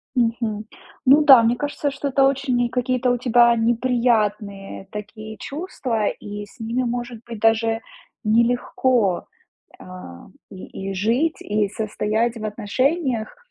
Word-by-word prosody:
Мгм. 230 -3 0 0.4
Ну 280 +4 +7
да, 265 -5 +8
мне 235 +2 +2
кажется, 290 0 -2
что 280 +1 -4
это 270 0 +2
очень 260 -3 +1
какие-то 250 0 0
у 245 - +1
тебя 240 -1 +4
неприятные 225 -5 0
такие 215 +1 -8
чувства, 260 - -3
и 205 0 -5
с 205 - -21
ними, 230 +3 -1
может 240 -1 -4
быть, 230 -3 -8
даже 225 0 +2 0.4
нелегко, 235 -2 +1 0.5
а, 180 - -11 0.2
и 195 0 -7
и - - -4
жить, 235 - +1
и 210 -1 0
состоять 220 +2 -1
в 215 - -6
отношениях. 245 - -1
230 Hz, 130 wpm, -22 LUFS, 210-255 Hz, 0.5 s, да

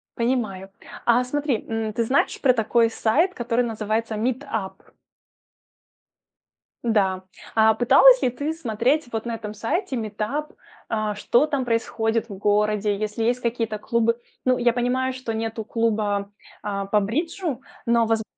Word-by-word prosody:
Понимаю. 225 -6 -1 0.4
А 240 +1 +4
смотри, 280 -2 -1
м, 225 -1 -2
ты 230 - 0
знаешь 255 +5 +1
про 260 -3 +5
такой 230 0 +2
сайт, 295 - +1
который 240 -2 0
называется 220 0 -2
Meetup? 230 -3 -2 2.1
Да. 195 -5 +1 0.3
А 220 0 +5
пыталась - - +6
ли - - +3
ты 285 +6 -3
смотреть 255 0 0
вот 225 0 -3
на 235 -1 -2
этом 210 -2 -6
сайте 265 - -2
Meetup, 225 +7 -3 0.3
а, 215 -2 -1
что 240 +6 +3
там 285 -4 -1
происходит 230 -1 0
в 210 - -8
городе, 210 0 +1
если 215 +2 -3
есть 240 +2 +1
какие-то 230 -3 -2
клубы? 230 +2 0 0.3
Ну, 255 -1 +3
я 240 -1 +2
понимаю, 255 +2 0
что 255 -3 -5
нету 225 0 -3
клуба, 210 -3 -1 0.3
а, 200 -1 -2
по 210 +1 +3
бриджу, 295 - -2 0.2
но, 235 -1 +3
воз 225 0 +1
230 Hz, 145 wpm, -23 LUFS, 215-250 Hz, 2.1 s, пыталась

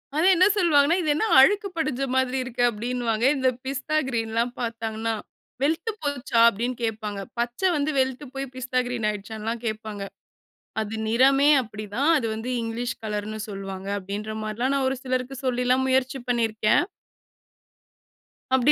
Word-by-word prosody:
அது 315 +3 +2
என்ன 365 +2 +5
சொல்வாங்கன்னா," 325 -3 +4
இது 315 - -1
என்ன 380 - +1
அழுக்கு 400 +9 +5
படிஞ்ச 285 -5 -1
மாதிரி 260 0 +1
இருக்கு?" 245 -1 -2
அப்படின்னுவாங்க. 235 0 -1
இந்த 260 -1 +3 0.2
பிஸ்தா 275 +3 -1
கிரீன்லாம் 230 0 -1
பார்த்தாங்கன்னா. 225 -1 -2 0.5
"வெழுத்து 325 +9 +1
போச்சா" 280 -5 -1
அப்படின்னு 235 +4 -3
கேட்பாங்க. 215 -2 -3 0.2
பச்ச 240 +4 -2 0.2
வந்து 290 +1 0
வெழுத்து 260 +2 0
போய் 270 0 -3
பிஸ்தா 255 0 -1
கிரீன் 240 -3 -1
ஆகிடுச்சான்னுலாம் 220 +3 -5
கேட்பாங்க. 215 -2 -4 0.8
அது 220 0 -4
நிறமே 270 +5 +5
அப்படிதான். 215 +6 -2
அது 255 -6 0
வந்து 225 +3 -4
இங்கிலீஷ் 230 +2 -3
கலர்ன்னு 215 0 -3
சொல்வாங்க 195 -1 -6
அப்படின்ற 200 +3 -5
மாரிலாம் 225 +5 -1
நான் 275 -1 +1
ஒரு 265 - -1
சிலருக்கு 255 0 -2
சொல்லிலாம் 250 +1 +2
முயற்சி 260 +1 +1
பண்ணியிருக்கேன். 225 -1 +2 1.7
அப்படி 260 +2 +5
245 Hz, 140 wpm, -25 LUFS, 220-270 Hz, 1.7 s, என்ன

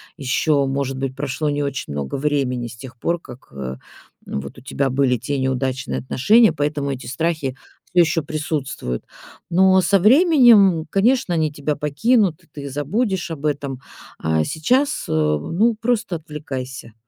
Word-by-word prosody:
ещё, 140 +2 +1
может 135 0 -2
быть, 135 -1 -3
прошло 140 +2 -2
не 145 0 -1
очень 140 - -3
много 70 -2 -3
времени 135 -4 -1
с 115 - -11
тех 125 -1 -11
пор, 170 +7 -1
как, 125 -5 -13
э, 65 -2 -5 0.5
вот, 70 0 -6
у - - -12
тебя 135 +1 -1
были 130 -1 +2
те 135 +5 -3
неудачные 130 - -1
отношения, 210 - +4
поэтому 145 -1 -1
эти 130 -1 -6
страхи 150 -1 -2 0.4
всё 180 - +5
ещё 165 0 +2
присутствуют. 145 - -3 0.5
Но 190 +2 +5
со 195 +3 +3
временем, 225 - +6
конечно, 230 -1 +2
они 155 -2 +1
тебя 145 0 -2
покинут, 180 - +1
и - - -26
ты 140 -1 -7
забудешь 175 - -1
об 155 -1 -3
этом. 140 -3 -3 0.4
А 80 0 +1
сейчас, 255 - 0
э, - - -2
ну, 80 - +1
просто 225 -6 0
отвлекайся, 135 -6 -7
145 Hz, 155 wpm, -21 LUFS, 130-175 Hz, 0.5 s, временем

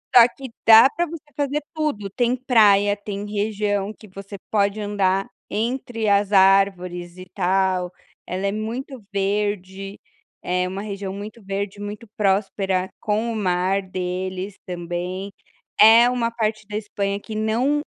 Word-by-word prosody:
Só 240 - +11
que 265 -3 -9
dá 225 +3 +9
para 340 +5 -1
você 330 -1 -8
fazer 290 +1 0
tudo, 300 -11 -2
tem 240 +4 +1
praia, 210 -6 +4
tem 205 0 -6
região 205 -1 -1
que 215 - -16
você 195 +1 -9
pode 205 0 +1
andar 195 -2 0 0.2
entre 230 0 -2
as 200 0 +3
árvores 190 -3 +3
e 185 - -9
tal, 185 -1 +1 0.4
ela 190 +2 -2
é - - 0
muito 230 +4 -5
verde, 195 -1 -2 0.4
é 180 0 0
uma 190 +2 -5
região 200 -2 -5
muito 210 +3 -8
verde, 195 +1 -4
muito 205 +2 -7
próspera 195 -2 0
com 220 +2 -1
o - - -4
mar 190 -1 +1
deles 185 +1 -4
também, 180 +2 -4 0.5
é 230 +3 +8
uma 240 -2 0
parte 215 -2 -2
da 210 - -6
Espanha 200 -2 -3
que 215 +1 -8
não 235 +7 +1
205 Hz, 145 wpm, -22 LUFS, 190-220 Hz, 0.5 s, Só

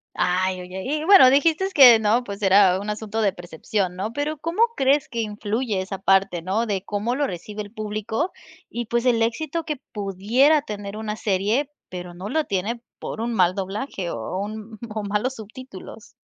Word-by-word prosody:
Ay, 185 +1 0
oye, 185 +1 -7
y 300 +3 -2
bueno, 370 -8 +8
dijiste 320 +7 +3
que 250 -5 +9
no, 220 +3 +2
pues, 200 0 -7
era 190 -1 +5
un 205 +1 -4
asunto 215 +1 -3
de 205 -3 +2
percepción, 180 +2 -3
¿no? 200 +5 -4
Pero 290 +3 -3
¿cómo 335 +8 -1
crees 275 +1 +2
que 235 -2 -3
influye 215 0 -2
esa 190 +1 -5
parte?, 195 -2 +2
¿no? 200 +7 0
De 200 -4 -2
cómo 210 +4 -2
lo 285 +2 0
recibe 210 +1 -6
el 205 - -12
público, 215 - -3 0.4
y 240 0 -4
pues, 235 +2 0
el 230 -2 +3
éxito 315 +8 -2
que 305 -2 -3 0.2
pudiera 220 +10 +2
tener 205 -3 -6
una 215 -1 -4
serie, 215 +8 0 0.2
pero 180 -1 -7
no 185 +3 -7
lo 310 +6 0
tiene 205 +4 -2 0.2
por - - -6
un 235 +1 -2
mal 185 -3 +3
doblaje 195 -1 -4
o 115 +9 -4
un 215 +1 -7
o 215 0 -4
malos 210 +6 -1
subtítulos. 255 +5 -11
215 Hz, 185 wpm, -23 LUFS, 195-255 Hz, 0.4 s, que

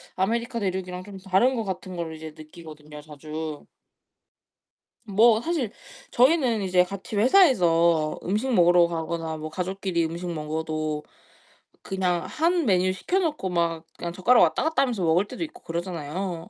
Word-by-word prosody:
아메리카 235 +5 -1
대륙이랑 185 -2 -3
좀 200 0 -10
다른 195 +8 +2
것 225 - -2
같은 185 -2 -6
걸 165 -2 -5
이제 155 0 -9
느끼거든요, 155 -2 -12
자주. 155 0 -7 1.4
뭐 220 +2 +4
사실 280 -7 -2 0.4
저희는 250 -5 +3
이제 180 -1 +3
같이 195 +3 -7
회사에서 175 - +4
음식 215 +8 -1
먹으러 175 -3 +5
가거나 165 -1 -4
뭐 155 0 -5
가족끼리 185 0 -2
음식 170 +2 -4
먹어도 155 -1 -3 0.8
그냥 180 -3 -1
한 335 +1 0
메뉴 185 -3 +2
시켜 360 - -1
놓고 305 - -2
막 170 -2 -1
그냥 170 -1 -5
젓가락 235 +7 +4
왔다 - - +1
갔다 320 -1 +2
하면서 235 -8 -2
먹을 170 +4 +3
때도 255 +8 -5
있고 315 - -9
그러잖아요. 170 +1 -4
180 Hz, 325 characters per minute, -25 LUFS, 165-220 Hz, 1.4 s, 먹으러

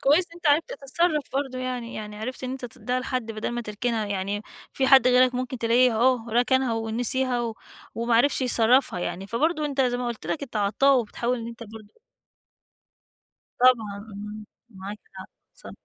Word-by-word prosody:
كويس 300 +7 +4
إن 335 - -23
أنت 345 -1 -5
عرفت 300 +8 +3
تتصرف 305 - 0
برضو 265 -2 -2
يعني، 250 -2 -4
يعني 210 -1 -7
عرفت 255 +4 -5
إن 255 - -3
أنت 260 0 -6
تدّيها 250 +1 -3
لحد 255 -3 -3
بدل 215 0 -3
ما 240 0 -3
تركنها، 220 0 -2
يعني 200 +1 -3 0.3
في 265 - 0
حد 265 -1 +7
غيرك 250 0 +4
ممكن 255 0 -3
تلاقيه 240 +2 +4
أهو 240 0 +2
ركنها 250 +1 +2
ونسيها 240 +3 -1
و 230 -2 -3 0.4
وما 235 +1 0
عرفش 260 +4 +3
يصرّفها 245 -3 +3
يعني، 190 +2 -4
فبرضو 305 +8 0
أنت 280 -2 -1
زي 250 -2 +2
ما 245 0 -3
قُلت 235 -2 -5
لك 305 - -2
أنت 245 -5 -6
عطّاء 220 +7 +3
وبتحاول 240 +2 -2
إن 230 - -6
أنت 235 0 -9
برضو 220 - -13 1.6
طبعًا 225 -5 +3
امم، 210 +1 -8 0.3
معاك 200 0 -8 0.2
حق، 190 - -9 0.3
صح. - - -12
245 Hz, 180 wpm, -25 LUFS, 220-260 Hz, 1.6 s, حد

